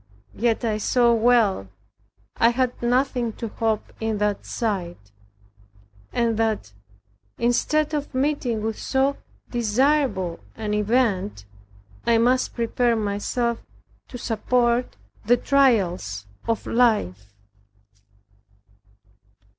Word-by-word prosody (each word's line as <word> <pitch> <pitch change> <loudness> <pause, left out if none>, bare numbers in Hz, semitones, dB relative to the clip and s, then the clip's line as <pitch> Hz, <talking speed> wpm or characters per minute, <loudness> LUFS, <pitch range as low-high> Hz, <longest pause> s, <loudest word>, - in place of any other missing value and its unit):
Yet 235 +2 0
I 215 -2 0
saw 240 +2 +3
well 225 - +3 0.7
I 230 - +5
had 250 +1 -1
nothing 245 -1 +1
to 230 0 -6
hope 220 0 -2
in 220 -1 -1
that 205 -1 -1
side; 195 -7 -2 1.1
and 230 -2 0
that, 215 - -1 0.6
instead 300 +6 +1
of 290 -1 -2
meeting 260 -5 0
with 220 0 -3
so 270 +1 +1 0.3
desirable 240 - +1 0.2
an 215 -2 -3
event, 210 - 0 0.6
I 235 -1 +3
must 250 +3 +2
prepare 235 0 +1
myself 220 +3 -1 0.4
to 245 - -8
support 240 +1 0 0.3
the 245 +3 +4
trials 190 - +1 0.2
of 230 -1 -1
life. 105 - +1
230 Hz, 100 wpm, -23 LUFS, 210-245 Hz, 1.1 s, I